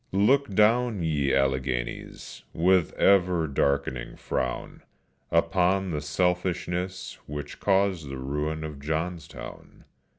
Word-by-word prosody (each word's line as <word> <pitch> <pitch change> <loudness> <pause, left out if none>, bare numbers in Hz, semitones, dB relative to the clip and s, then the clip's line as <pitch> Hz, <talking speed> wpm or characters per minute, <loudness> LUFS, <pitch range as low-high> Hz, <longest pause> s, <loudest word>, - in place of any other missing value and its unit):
_" 100 +2 +3
Look 140 -5 +2
down, 110 -2 +3
ye 75 -4 +1
Alleghenies, 65 -2 -2
with 90 +1 +3
ever 90 -4 +3
darkening 70 -3 -1
frown, 65 -2 -3 0.5
Upon 95 +1 +2
the 75 -2 -2
selfishness 90 +3 -1
which 75 0 -6
caused 95 -6 +1
the 70 - -5
ruin 75 +4 -3
of 75 -2 -6
Johnstown. 80 +3 -5
85 Hz, 105 wpm, -27 LUFS, 70-95 Hz, 0.5 s, _"